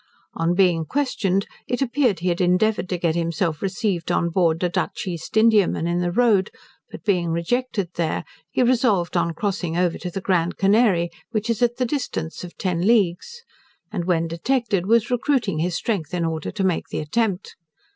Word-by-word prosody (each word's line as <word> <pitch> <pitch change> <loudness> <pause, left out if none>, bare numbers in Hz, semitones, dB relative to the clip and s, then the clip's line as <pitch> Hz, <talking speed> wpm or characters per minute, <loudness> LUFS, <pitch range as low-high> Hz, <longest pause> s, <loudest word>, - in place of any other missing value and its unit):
On 165 +2 0
being 180 -4 +3
questioned, 200 - 0 0.2
it 245 - -1
appeared 250 -7 +1
he 180 - 0
had 175 +1 0
endeavoured 180 +2 +2
to 180 - -1
get 170 -2 0
himself 165 -1 -1
received 195 -3 -1
on 170 - +1
board 170 -1 +1
a - - +3
Dutch 195 +3 -2
East 180 +3 -4
Indiaman 220 -6 +4
in 175 +1 0
the 175 0 0
road; 210 -2 +3 0.4
but - - -10
being 180 -5 +1
rejected 200 +3 -1
there, 165 -2 -1 0.3
he 255 - +1
resolved 230 -9 +2
on 165 -1 +1
crossing 180 -3 -2
over 180 -1 +1
to 180 - -4
the 185 - -4
Grand 180 -2 0
Canary, 195 -4 +3 0.2
which 225 0 -1
is 230 - -3
at 240 0 +2
the 255 - +1
distance 245 - -3
of 175 - -10
ten 180 -3 -1
leagues, 225 - +1 0.5
and 180 -5 -3
when 165 -2 +1
detected, 195 +2 -1
was 230 +3 +3
recruiting 245 - +1
his 175 +1 -1
strength 180 -7 -2
in 170 -1 0
order 160 -2 -3
to 195 - -3
make 185 -3 0
the - - -5
attempt. 200 +4 -1
185 Hz, 185 wpm, -22 LUFS, 170-225 Hz, 0.5 s, Indiaman